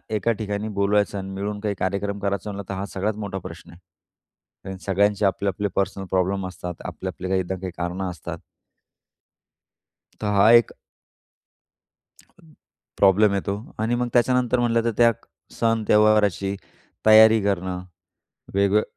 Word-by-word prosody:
एका 110 +3 +1
ठिकाणी 105 0 -3
बोलवायचं 100 0 +1
आणि 95 0 -5
मिळून 100 +1 -4
काही 105 -1 -2
कार्यक्रम 100 +2 -2
करायचं 100 0 -2
म्हणलं 100 -1 -8
तर 100 - -3
हा 95 +1 -4
सगळ्यात 105 +2 -1
मोठा 95 -1 -5
प्रश्न 85 -1 -12
आहे 90 +2 -19
आणि 95 -1 -7
सगळ्यांचे 100 +1 +2
आपले-आपले 100 +1 0
पर्सनल 95 0 -1
प्रॉब्लेम 95 +1 0
असतात, 90 -1 -7
आपले-आपले 95 0 -6
काही 95 -1 +1
ना 95 - -1
काही 95 -2 -4
कारणं 90 +2 -3
असतात. 90 - -7 1.8
तर 105 - -3
हा 100 +3 +6
एक 120 -1 +5 2.2
प्रॉब्लेम 100 +1 +4
येतो 100 0 -2 0.2
आणि 110 +2 0
मग 120 0 -1
त्याच्यानंतर 125 0 +2
म्हणलं 115 -1 +1
तर 115 - +1
त्या 115 -1 +6 0.4
सण, 115 -1 0
त्यौहाराची 105 -2 +3 0.5
तयारी 110 0 +7
करणं. 95 -2 -2 0.7
वेगवे 100 +2 +3
100 Hz, 135 wpm, -23 LUFS, 95-110 Hz, 2.2 s, तयारी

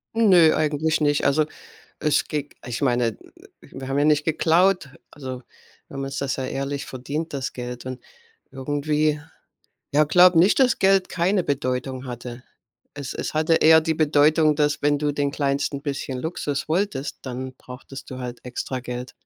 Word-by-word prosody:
Nö, 185 -8 +6
eigentlich 155 +1 0
nicht. 145 -1 +2
Also, 150 +2 +3 0.5
es 150 - +1
geht 145 -1 -4
ich 120 +1 -4
meine, 120 -4 +1
w - - -17 0.5
wir 130 - -7
haben 135 - -1
ja 145 - +3
nicht 150 -1 +3
geklaut. 165 +1 +2 0.2
Also, 130 -3 -7 0.5
wir - - -12
haben 135 - -3
uns 135 0 -5
das 140 -2 -1
ja 130 - -3
ehrlich 140 +1 -3
verdient 145 +5 -5
das 135 -2 -3
Geld 125 0 -7
und 130 -1 -6 0.5
irgendwie 150 +2 0 0.7
ja, 150 +2 +5
glaube 180 +2 +6
nicht, 185 +5 +5
dass 255 -2 +3
Geld 195 -1 +3
keine 180 +2 +1
Bedeutung 130 -1 -2
hatte. 120 0 -7 0.5
Es 140 -3 -6
es - - -4
hatte 155 +1 +2
eher 160 0 +6
die 160 0 -1
Bedeutung, 155 0 +3
dass 145 -1 +1
wenn 145 0 +2
du 145 0 0
den 145 0 -1
kleinsten 140 0 -1
bisschen 135 -2 -4
Luxus 150 -3 -3
wolltest, 160 -5 -1
dann 130 0 -6
brauchtest 130 +1 -11
du 130 - -6
halt 125 -1 -7
extra 125 +1 -4
Geld. 125 0 -6
145 Hz, 170 wpm, -23 LUFS, 130-155 Hz, 0.7 s, Nö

